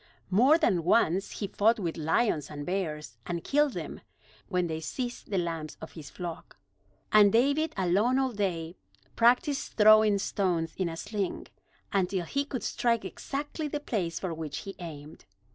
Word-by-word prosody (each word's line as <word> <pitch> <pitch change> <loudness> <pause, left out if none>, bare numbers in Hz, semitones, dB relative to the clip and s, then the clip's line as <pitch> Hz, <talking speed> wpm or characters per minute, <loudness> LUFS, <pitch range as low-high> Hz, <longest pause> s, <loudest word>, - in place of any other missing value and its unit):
More 255 - +6
than 180 - +2
once 190 0 +3
he 205 - -4
fought 220 +4 +3
with 175 -6 -3
lions, 160 - +1
and 145 -1 -6
bears, 155 -9 -3
and 170 -1 -3
killed 295 -1 +2
them, - - -6 0.5
when 180 -2 +1
they 160 -2 -3
seized 240 - -5
the 200 - 0
lambs 165 -3 -3
of 160 - -9
his 150 -4 -10
flock. 170 - -7 0.5
And 210 -1 +7
David, 285 +7 +2
alone 195 +8 +2
all 265 -1 +1
day, 175 -5 -2 0.4
practiced 250 +4 +2
throwing 215 -1 +7
stones 180 -5 -1
in 185 -3 -1
a 165 - -6
sling, 200 +1 -4 0.4
until 190 -2 0
he 280 - -1
could 265 -4 -5
strike 230 -2 0
exactly 295 +2 -4
the 295 0 -3
place 190 -12 -2
for 185 -3 -3
which 155 -3 -5
he 195 - -8
aimed. 155 -3 -9
195 Hz, 160 wpm, -29 LUFS, 165-235 Hz, 0.5 s, And